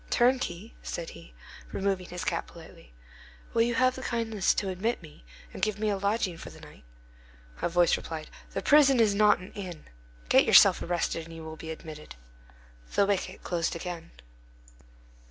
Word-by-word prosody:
"Turnkey," 240 -5 +1
said 170 - -5
he, 85 -8 -13 0.4
removing 195 -2 -1
his 180 0 -5
cap - - -1
politely, - - -14 0.6
"will 230 - +3
you 235 +1 +2
have 255 0 +3
the 260 - -8
kindness 225 -5 0
to 195 - -1
admit 205 +6 -1
me, 150 - -14 0.3
and - - -8
give 215 -2 +1
me 215 0 0
a 200 - 0
lodging 200 -4 0
for - - -8
the - - -14
night?" - - -14 0.8
A - - +1
voice 175 0 +4
replied:— 160 -2 -7 0.2
"The - - -2
prison 280 -4 +6
is 215 -3 +4
not 210 +1 +5
an 185 +2 -11
inn. 185 -6 -7 0.4
Get - - +6
yourself - - +7
arrested, 170 -1 -2
and 165 - -10
you 165 - -9
will 160 0 -7
be 160 0 -9
admitted." 155 -1 -9 0.8
The 200 - +5
wicket 195 -1 -2
closed 170 -2 -1
again. 170 -1 -6
185 Hz, 175 wpm, -28 LUFS, 165-220 Hz, 0.8 s, yourself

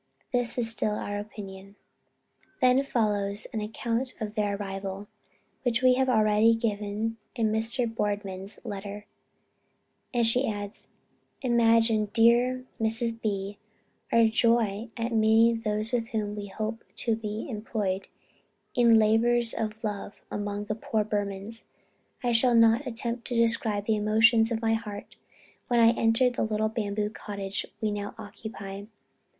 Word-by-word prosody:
This 245 -1 +1
is 240 -2 +2
still 220 -2 0
our 205 -1 -3
opinion." 200 -1 -9 0.8
Then 255 0 +5
follows 210 -6 0
an 220 - -2
account 230 +4 -2
of 210 -2 -4
their 205 -2 0
arrival, 195 0 -5 0.5
which 245 0 0
we 255 0 +7
have 260 +1 +1
already 215 -1 +4
given 215 0 -2 0.2
in 225 -3 +1
Mr. 225 +3 +1
Boardman's 205 -3 -3
letter, 205 -1 -6 1.1
and 240 -2 +2
she 245 +3 +3
adds: 205 -1 -5 0.6
"Imagine, 230 -3 +3
dear 245 +2 +4 0.2
Mrs. 225 +1 0
B. 200 -1 -3 0.5
our 230 0 +5
joy 225 -1 +2
at 235 +1 -2
meeting 225 +1 +4
those 215 0 -2
with 235 -2 0
whom 210 -2 -3
we 205 -1 -5
hope 215 +3 -4
to 230 -2 0
be 215 -1 -5
employed 210 -5 -3 0.7
in 235 -2 +5
labors 230 +2 +3
of 220 0 -4
love 205 -1 -4 0.2
among 205 0 -3
the 215 - -2
poor 220 0 -1
Burmans. 205 +1 -3 0.6
I 245 - +1
shall 235 +1 +4
not 230 +4 +5
attempt 235 0 -3
to 245 - -3
describe 225 -3 +2
the 220 -1 +2
emotions 225 +2 +4
of 230 0 -2
my 225 0 +3
heart 210 -2 -5 0.5
when 240 -1 +2
I 230 0 +7
entered 235 +2 +2
the - - -1
little 215 0 0
bamboo 210 -1 -2
cottage 200 -3 -4
we 215 -2 0
now 205 0 -4
occupy. 200 -2 -8
220 Hz, 140 wpm, -27 LUFS, 205-230 Hz, 1.1 s, we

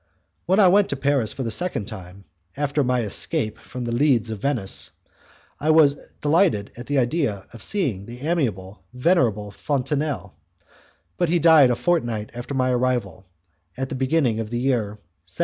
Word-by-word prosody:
When 190 +4 +3
I 195 - +7
went 200 +2 +4
to - - -1
Paris 135 -5 +1
for 135 - -4
the 115 - -2
second 175 - 0
time, 95 0 -10 0.3
after 145 0 0
my 125 -1 +1
escape 110 0 0
from 125 -1 -7
The 120 - -3
Leads 120 -3 +2
of 110 - -5
Venice, 125 -9 0 0.7
I 155 - -1
was 155 -3 +6 0.3
delighted 150 - +2
at 120 +1 -9
the 145 - 0
idea 120 - 0
of 115 - -11
seeing 170 - 0
again 100 - -11
the 125 +5 -7
amiable, 110 - -2
venerable 125 - +1
Fontenelle, 135 - -2 0.8
but 175 -2 +1
he 175 - +3
died 160 -5 +6
a 120 - +2
fortnight 120 -10 -1
after 120 +3 -6
my 130 -1 +1
arrival, 120 -6 -1 0.5
at 135 0 -3
the - - -5
beginning 130 -3 +1
of 110 -1 -4
the 120 - -3
year 120 -5 -1 0.3
1757. - - -4
125 Hz, 175 wpm, -23 LUFS, 110-150 Hz, 0.8 s, I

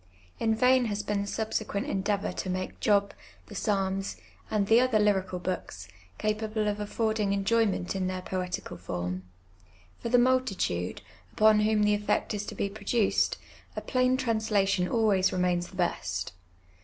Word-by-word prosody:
In 225 -1 +2
vain 255 +2 +4
has 210 -2 -2
been 205 -1 -1
the 200 - -4
subsequent 215 -1 -2
endeavour 200 +1 -1
to 185 - -4
make 185 0 -3
Job, 200 -1 +2 0.3
the - - -12
Psalms, 195 - -1 0.3
and 210 -2 +1
the 225 +3 +5
other 255 -3 +3
hTical 190 -3 +1
books, 95 - -4 0.3
capable 215 0 -1
of 210 0 -1
affording 215 -1 0
enjoyment 200 -2 +1
in 185 -1 -1
their 185 0 -3
poetical 180 - -4
form. 90 +1 -4 0.8
For 235 - -4
the 245 - +5
multitude, 240 - +1 0.3
upon 215 0 +5
whom 210 0 +3
the 210 0 +4
effect 210 +1 0
is 210 0 -4
to - - -6
be - - -1
produced, 210 +1 +1 0.4
a - - -3
plain 255 0 +2
translation 215 -7 +1
always 205 -5 +2
remains 180 -1 0
the - - -14
best. 175 - -2
205 Hz, 155 wpm, -28 LUFS, 185-220 Hz, 0.8 s, the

